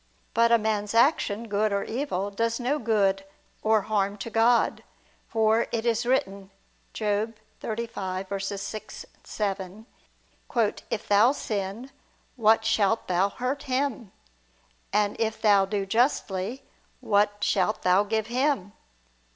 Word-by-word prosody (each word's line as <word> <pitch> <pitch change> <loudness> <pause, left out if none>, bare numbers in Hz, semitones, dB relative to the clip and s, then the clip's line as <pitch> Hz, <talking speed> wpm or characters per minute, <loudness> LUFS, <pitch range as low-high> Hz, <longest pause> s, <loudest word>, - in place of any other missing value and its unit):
But 230 0 +3
a 235 - +7
man's 210 -1 -2
action, 230 -4 +2
good 210 0 0
or 200 0 0
evil, 220 -6 -3
does 230 +3 -1
no 265 +5 0
good 200 -5 +1 0.4
or 220 -1 +3
harm 205 -1 0
to 225 +3 -6
God; 230 +2 +3 0.4
for 220 +1 +2
it 230 0 -2
is 235 0 +1
written 195 -6 0 0.4
(Job 215 +1 -1 0.3
35:6, 200 -2 -5 0.2
7): 200 0 -4 1.0
"If 230 - -4
thou 210 +6 +5
sin, 210 +2 -4 0.4
what 220 -2 +3
shalt 225 0 +1
thou 185 +2 +2
hurt 255 +7 -3
Him?... 255 -6 -1 0.8
And 210 -1 +1
if 220 -1 -1
thou 205 -3 +4
do 200 0 -2
justly, 225 +1 0 0.4
what 205 -3 +1
shalt 205 +2 +1
thou 185 +2 +4
give 220 +1 -1
Him?" 240 -4 0
215 Hz, 120 wpm, -26 LUFS, 200-230 Hz, 1.0 s, a